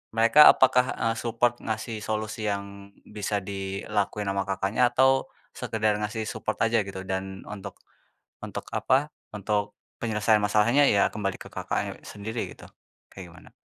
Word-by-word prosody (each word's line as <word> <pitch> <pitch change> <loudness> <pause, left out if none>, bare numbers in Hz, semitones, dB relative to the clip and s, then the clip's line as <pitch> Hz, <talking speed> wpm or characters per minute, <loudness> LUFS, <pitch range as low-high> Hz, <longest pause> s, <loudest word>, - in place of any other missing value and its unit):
Mereka 115 +7 +7
apakah, 125 -1 +3
eee, 115 0 0
support 120 +1 0
ngasih 110 0 -4
solusi 110 0 -3
yang 100 0 -5
bisa 105 -1 -3
dilakuin 100 +1 -3
ama 100 0 -2
Kakaknya 100 +5 +1
atau 135 0 +4 0.2
sekedar 110 -1 -1
ngasih 110 +1 -3
support 110 0 -3
aja 115 0 +3
gitu? 95 -2 -5
Dan 95 0 -4
untuk 105 -2 -8 0.7
untuk - - -7
apa, 140 +3 +2 0.2
untuk 105 0 -1 0.3
penyelesaian 110 -1 +2
masalahnya 110 +7 +4
ya 100 -6 +4
kembali 100 -2 -4
ke - - -9
Kakaknya - - -3
sendiri 110 +3 -5
gitu, - - -14 0.4
kayak 90 -3 -11
gimana? - - -16
105 Hz, 140 wpm, -26 LUFS, 100-115 Hz, 0.7 s, Mereka